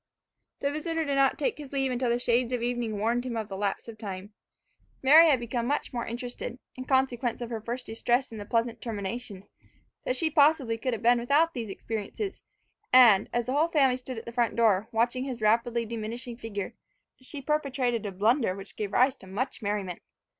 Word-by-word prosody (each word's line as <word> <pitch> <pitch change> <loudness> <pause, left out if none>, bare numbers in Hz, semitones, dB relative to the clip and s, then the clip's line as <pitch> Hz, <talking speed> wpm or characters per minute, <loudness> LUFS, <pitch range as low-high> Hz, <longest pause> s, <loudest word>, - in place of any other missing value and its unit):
The 280 - 0
visitor 325 +2 -2
did 285 - -1
not 275 -1 +3
take 480 -10 -1
his 285 -3 -9
leave 270 -2 0
until 250 0 0
the 235 - +2
shades 245 0 +1
of 240 -2 -1
evening 240 -3 -1
warned 230 +4 0
him 245 -2 -4
of 220 -1 -4
the 195 - -5
lapse 200 +2 -2
of 225 -2 -10
time. 195 0 -7 0.7
Mary 315 +5 +8
had 270 -4 +4
become 235 0 -2
much 290 0 -1
more 235 -1 -3
interested, 245 0 -5 0.2
in 255 - -7
consequence 260 -3 +1
of 240 -1 -6
her 225 -2 -3
first 240 +3 -5
distress 240 +3 0
and 220 -2 -7
the - - -7
pleasant 230 +1 -1
termination, 210 -2 -5 0.6
than 255 - -1
she 315 +4 +1
possibly 290 -6 +3
could 255 +1 -1
have 225 - -5
been 240 +1 +5
without 295 +7 +3
these 230 -5 -5
experiences; 225 - -5 0.5
and 235 -6 +7
as 240 -1 0
the 255 - -2
whole 305 +4 +3
family 275 -6 +3
stood 255 -1 -7
at 225 - -7
the 235 - -6
front 235 -1 0
door, 220 -3 +3
watching 240 +3 +1
his 255 -3 -5
rapidly 230 +2 +2
diminishing 230 +2 -5
figure, 210 -4 -5 0.5
she 280 +3 -8
perpetrated 265 -5 0
a - - -4
blunder 215 +2 +2
which 195 0 -10
gave 205 -1 -4
rise 255 +4 +4
to 190 - -15
much 240 +9 -3
merriment. 200 -4 -3
240 Hz, 205 wpm, -28 LUFS, 225-260 Hz, 0.7 s, Mary